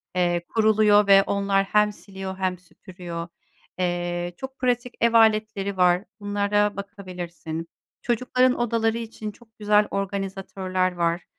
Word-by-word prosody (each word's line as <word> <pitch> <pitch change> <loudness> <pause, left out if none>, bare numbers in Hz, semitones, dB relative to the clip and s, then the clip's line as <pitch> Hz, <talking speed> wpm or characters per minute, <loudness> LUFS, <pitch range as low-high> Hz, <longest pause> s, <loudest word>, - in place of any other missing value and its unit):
eee, 175 -1 +1
kuruluyor 215 -2 +4
ve 195 0 +7
onlar 200 0 +1
hem 210 +1 +3
siliyor 190 -2 -8
hem 185 -1 -1
süpürüyor. 175 -1 -8 0.5
Eee, 175 -1 -2
çok 265 0 -8
pratik 245 -1 0
ev 235 0 +3
aletleri 215 -3 +3
var. 180 0 +4 0.2
Bunlara 205 0 0
bakabilirsin. 180 -5 -7 0.3
Çocukların 255 +1 +1
odaları 230 -1 +1
için 220 -2 -6
çok 225 +1 -22
güzel 210 0 +3
organizatörler 195 -1 -2
var, 170 0 0
200 Hz, 120 wpm, -24 LUFS, 180-215 Hz, 0.5 s, ve